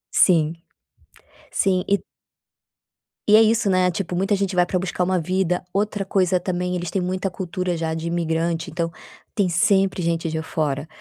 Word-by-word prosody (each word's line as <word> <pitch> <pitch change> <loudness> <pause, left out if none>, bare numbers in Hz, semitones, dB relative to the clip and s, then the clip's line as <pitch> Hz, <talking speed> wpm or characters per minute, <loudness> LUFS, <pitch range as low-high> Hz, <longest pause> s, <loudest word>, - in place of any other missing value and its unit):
Sim. 165 -4 +4 1.0
Sim 185 -2 +1
e 200 0 +2 1.3
E 210 - +7
é 220 - +8
isso, 220 -2 +3
né, 185 0 +3
tipo, 180 0 -3
muita 195 +3 +1
gente 195 -1 -1
vai 180 0 +3
pra 185 - 0
buscar 180 0 -1
uma 185 0 +1
vida. 180 +1 -1
Outra 205 0 -1
coisa 185 -1 +2
também, 180 0 -2
eles 175 -2 -3
têm 195 - 0
muita 185 +2 -2
cultura 180 -1 -3
já 160 -1 -2
de 160 0 -5
imigrante, 165 0 -1
então, 165 0 -2 0.4
tem 200 -3 +1
sempre 190 +1 +2
gente 165 0 0
de 160 0 -2
fora, 150 -2 -2
180 Hz, 170 wpm, -22 LUFS, 165-190 Hz, 1.3 s, é